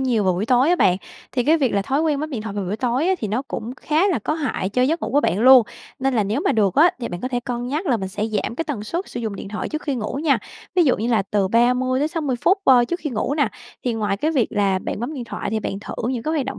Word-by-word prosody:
nhiều 240 -6 +1
vào 185 - +3
buổi 190 +5 -2
tối 255 +3 +4
á 355 - +4
bạn, 180 - +4 0.4
thì 250 -2 0
cái 315 +5 +4
việc 265 -5 +1
là 200 - +2
thói 270 +8 0
quen 300 -3 +1
bấm 310 +1 -4
điện 240 -7 -4
thoại 215 -2 -6
vào 200 -1 -2
buổi 190 +4 -3
tối 255 +7 0
á, 380 - +3
thì 215 - -3
nó 225 +6 -1
cũng 230 +3 -5
khá 325 +5 +2
là 345 -9 +1
có 305 +8 -2
hại 285 -11 -2
cho 250 +5 +1
giấc 315 +6 +1
ngủ - - -2
của 290 - +4
bạn 190 -7 0
luôn, 255 0 +8 0.4
nên 265 0 0
là 215 -4 +2
nếu 215 +8 -1
mà - - +1
được 200 -4 +2
á, 335 +4 +6
thì 235 - -3
bạn 175 - -6
có 255 - -2
thể 245 -2 -1
cân 245 0 -4
nhắc 310 +7 -2
là 250 -5 +2
mình 190 -2 -4
sẽ 205 +2 -3
giảm 215 +1 -2
cái 330 - -2
tần 255 -10 -4
suất 345 - -4
sử - - -5
dụng 220 -4 -4
điện - - -7
thoại 215 - -4
trước 310 0 -4
khi 285 - -2
ngủ 235 +2 -3
nha, 290 -4 +3 0.4
ví 355 -2 +4
dụ 265 - +3
như 225 +3 -2
là 225 -5 +2
từ 195 -1 0
30-60 255 - +1
phút, 385 +3 +4
ơ, 250 -5 +6
trước 345 +8 -3
khi 300 - -3
ngủ 245 +5 -1
nè. 290 -7 +2 0.4
Thì 245 - 0
ngoài 210 -3 -1
cái 300 +10 0
việc 270 -8 +2
là 200 -2 +1
bạn 195 - -5
bấm 245 +7 -4
điện 250 -4 -5
thoại - - -5
thì 220 0 -1
bạn 195 - -4
thử - - -7 0.2
những 240 -3 -3
cái 310 - -2
hoạt 275 -4 -1
động 270 - -5
245 Hz, 315 wpm, -22 LUFS, 215-290 Hz, 0.4 s, luôn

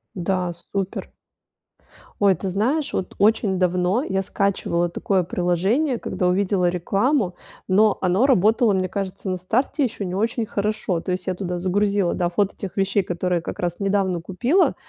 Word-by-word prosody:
Да, 180 -1 -1
супер. 195 +2 -5 1.1
Ой, 200 -2 +5
ты 190 - -4
знаешь, 250 - 0
от 185 - -3
очень 210 -2 +3
давно 180 +6 +1
я 195 -5 -1
скачивала 185 -3 0
такое 185 +2 0
приложение, 190 - 0
когда 180 - -1
увидела 185 0 +2
рекламу, 195 - +1 0.3
но 210 +3 +4
оно 185 +6 +3
работало, 225 -2 +4
мне 185 -1 0
кажется, 195 0 -4
на 185 - -1
старте 250 - 0
ещё 220 -4 -4
не 180 -1 -3
очень 225 +3 0
хорошо. 210 -4 -1
То 180 +2 -3
есть, 185 - -4
я 185 - +1
туда 180 -1 -3
загрузила, 200 +1 +1
да, 175 - 0
фото 190 +3 -1
тех 195 - -6
вещей, 195 0 +1
которые 180 0 -1
как - - -7
раз 175 -1 -1
недавно 195 -3 +1
купила, 240 - +1
190 Hz, 160 wpm, -22 LUFS, 180-210 Hz, 1.1 s, Ой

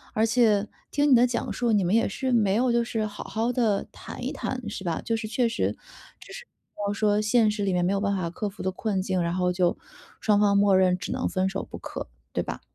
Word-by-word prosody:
而 220 +1 +3
且 220 -3 +3 0.2
听 290 0 +2
你 - - +9
的 245 +1 +5
讲 240 -1 -2
述， 240 -2 0
你 205 -3 +3
们 180 +4 +1
也 230 - +3
是 260 +5 -2
没 210 -4 +3
有 245 +1 +2
就 235 0 +2
是 225 -2 -2
好 210 0 -7
好 230 +3 -1
地 220 -5 +1
谈 - - -9
一 - - -2
谈 250 -4 -4
是 195 - -6
吧， 170 -2 -1
就 230 - 0
是 220 -1 -4
确 235 +2 +1
实 230 - 0 0.5
就 - - -13
是 - - -9
比 - - -52 0.3
方 200 - 0
说 210 0 +2
现 215 0 +3
实 210 -1 -3
里 195 - +1
面 175 0 +1
没 195 - +1
有 200 - 0
办 200 -1 +1
法 170 -2 -2
克 205 +3 -3
服 195 - -9
的 190 - 0
困 195 0 -2
境， 185 -2 0
然 170 +1 -1
后 180 -1 +1
就 175 -1 +1 0.4
双 210 -2 +3
方 200 -1 +4
默 200 -1 +4
认 185 -1 +3
只 - - -6
能 - - -1
分 185 0 0
手 195 - -4
不 - - -7
可， - - -7 0.2
对 - - 0
吧？ - - -6
210 Hz, 280 characters per minute, -26 LUFS, 190-230 Hz, 0.5 s, 你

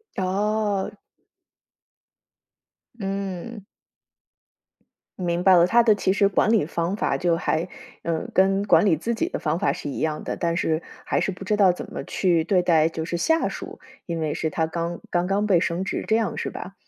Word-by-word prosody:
哦。 205 +1 -1 2.0
嗯。 195 +1 -5 1.6
明 175 -1 -1
白 190 -1 +7
了， 170 -1 +6
他 235 +6 +4
的 220 -3 +4
其 190 -1 +1
实 200 -1 +3
管 200 +2 +2
理 220 -7 +4
方 170 +4 -2
法 - - 0
就 175 -2 +1
还， 165 +1 -1 0.4
呃， 165 -1 -2
跟 195 +1 +3
管 210 - +5
理 170 -5 +4
自 230 +9 -2
己 330 - -1
的 - - -4
方 - - -1
法 - - +1
是 - - -6
一 140 - -5
样 155 -1 -2
的， - - -4
但 170 -1 0
是 160 -2 0 0.3
还 - - 0
是 - - 0
不 185 +1 -9
知 210 +1 0
道 195 -3 +6
怎 175 - -8
么 - - -5
去 175 -4 +1
对 180 +2 +2
待 165 -3 +3
就 165 -1 -4
是 170 +1 -3
下 320 - +2
属， - - -8 0.3
因 170 -2 -3
为 155 -2 -1
是 160 - -2
他 160 -1 0
刚 170 +1 -4
刚 175 0 0
刚 200 +3 0
被 185 -4 +4
升 170 +2 -1
职， 195 - -3
这 220 - +3
样 220 -5 -1
是 - - -3
吧？ 195 - -8
185 Hz, 205 characters per minute, -24 LUFS, 170-205 Hz, 2.0 s, 白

